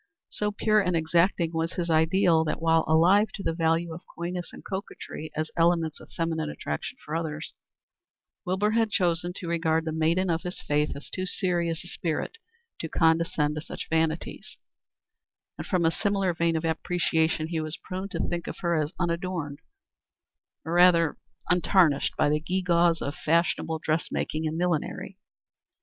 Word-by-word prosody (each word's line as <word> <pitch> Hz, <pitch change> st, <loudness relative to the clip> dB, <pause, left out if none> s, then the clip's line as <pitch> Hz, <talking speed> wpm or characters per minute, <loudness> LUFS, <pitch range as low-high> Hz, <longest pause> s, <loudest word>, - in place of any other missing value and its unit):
So 210 Hz, 0 st, -1 dB
pure 215 Hz, +1 st, +2 dB
and 180 Hz, -3 st, 0 dB
exacting 170 Hz, +1 st, +2 dB
was 165 Hz, +2 st, -1 dB
his 170 Hz, -2 st, -2 dB
ideal 160 Hz, +1 st, +4 dB
that 155 Hz, -, -2 dB
while 165 Hz, 0 st, +3 dB
alive 180 Hz, +7 st, +5 dB
to 195 Hz, -, -6 dB
the -, -, 0 dB
value 165 Hz, 0 st, +1 dB
of 165 Hz, -, -8 dB, 0.2 s
coyness 175 Hz, +1 st, -4 dB
and -, -, -12 dB
coquetry 190 Hz, -5 st, -6 dB
as 155 Hz, 0 st, -2 dB
elements 165 Hz, -2 st, +2 dB
of -, -, -15 dB
feminine 160 Hz, -2 st, -2 dB
attraction 75 Hz, -, -5 dB
for 155 Hz, -, -4 dB
others, 155 Hz, -1 st, -4 dB, 0.9 s
Wilbur 200 Hz, +2 st, +1 dB
had 225 Hz, 0 st, +2 dB
chosen 175 Hz, -2 st, +1 dB
to 180 Hz, -1 st, -6 dB
regard 165 Hz, -1 st, +1 dB
the 160 Hz, -, -2 dB
maiden 165 Hz, +4 st, +1 dB
of 165 Hz, 0 st, 0 dB
his 180 Hz, 0 st, -6 dB
faith 150 Hz, +1 st, 0 dB
as 140 Hz, -, -10 dB
too 185 Hz, 0 st, -2 dB
serious 175 Hz, -3 st, -1 dB
a -, -, -10 dB
spirit 175 Hz, -, -3 dB, 0.4 s
to 160 Hz, -, -4 dB
condescend 160 Hz, -2 st, +2 dB
to 155 Hz, -, -4 dB
such -, -, -7 dB
vanities; 160 Hz, 0 st, -1 dB, 1.0 s
and -, -, -5 dB
from 180 Hz, -5 st, +1 dB
a 165 Hz, -, +4 dB
similar 195 Hz, -2 st, 0 dB
vein 165 Hz, 0 st, +1 dB
of 160 Hz, +1 st, -1 dB
appreciation 160 Hz, -1 st, 0 dB
he 165 Hz, -2 st, -1 dB
was 155 Hz, +1 st, -4 dB
prone 185 Hz, +1 st, -6 dB
to 170 Hz, -6 st, -2 dB
think 170 Hz, 0 st, -3 dB
of -, -, -5 dB
her 170 Hz, -3 st, +1 dB
as 150 Hz, +4 st, -4 dB
unadorned, 170 Hz, -4 st, -2 dB, 1.1 s
or 165 Hz, -, -3 dB
rather 175 Hz, -2 st, +5 dB, 0.4 s
untarnished, 180 Hz, -4 st, +3 dB
by -, -, +3 dB
the 150 Hz, +1 st, +2 dB
gewgaws 170 Hz, 0 st, +2 dB
of 140 Hz, -, -3 dB
fashionable 165 Hz, 0 st, +1 dB
dressmaking 155 Hz, 0 st, -1 dB
and 155 Hz, +1 st, -3 dB
millinery. 175 Hz, -3 st, -2 dB
165 Hz, 165 wpm, -27 LUFS, 160-180 Hz, 1.1 s, alive